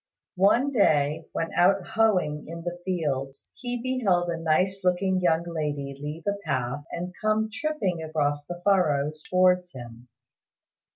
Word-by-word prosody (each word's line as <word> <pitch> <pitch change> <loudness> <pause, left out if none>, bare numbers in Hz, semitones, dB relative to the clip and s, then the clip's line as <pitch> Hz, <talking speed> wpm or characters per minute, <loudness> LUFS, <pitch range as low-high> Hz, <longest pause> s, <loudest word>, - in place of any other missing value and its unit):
One 240 +8 +4
day 155 - +2
when 165 - -3
out 185 +1 +3
hoeing 200 -9 +1
in 165 +1 -7
the 175 0 -5
fields, 140 -7 -3
he 245 -1 -4
beheld 210 -9 +1
a 165 - -2
nice 185 +4 +1
looking 185 +1 +1
young 170 -2 +2
lady 150 -5 -3
leave 150 +3 -6
the 200 0 -1
path 130 +1 -2
and 180 +1 -5
come 215 0 +1
tripping 290 - -2
across 145 -2 -1
the 175 0 -6
furrows 155 -6 +2
towards 180 -1 +3
him. 120 -1 -10
175 Hz, 140 wpm, -26 LUFS, 150-195 Hz, -, One